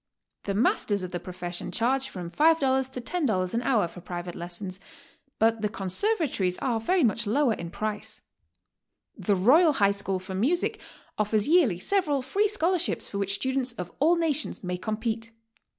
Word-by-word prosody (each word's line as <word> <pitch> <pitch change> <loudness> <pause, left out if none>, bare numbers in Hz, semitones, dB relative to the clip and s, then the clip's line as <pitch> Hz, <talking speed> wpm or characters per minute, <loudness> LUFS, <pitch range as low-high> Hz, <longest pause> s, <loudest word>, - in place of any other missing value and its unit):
The 200 - -1
mas'ters 205 -2 +1
of 180 - -5
the 175 - -3
profession 175 -1 -5
charge 265 +3 +1
from 175 -2 -7
$5 270 - +3
to 250 - -4
$10 225 - -1
an 230 - +1
hour 240 -8 +2
for 180 - -12
private 175 -1 -6
lesisons, 180 +2 -6 0.6
but 225 0 +2
the 210 - 0
conservator^ies 210 - 0
are 240 -4 0
very 355 +9 +2
much 230 -1 +1
lower 265 +2 +3
in 170 -4 -6
price. 215 +3 -4 0.9
The 205 - +1
Royal 295 - +5
High 200 -6 +3
School 200 -1 -1
for 185 +1 -7
Music 270 - +1 0.4
offers 210 0 +1
yearly 305 - +4
several 295 - 0
free 410 +10 +1
scholarships 365 -4 0
for 200 - -4
which 200 0 0
students 260 +2 -1
of 180 -6 -6
all 320 +5 +4
nations 315 -8 -1
may 180 0 -2
compete. 220 +3 -2
225 Hz, 165 wpm, -27 LUFS, 190-280 Hz, 0.9 s, Royal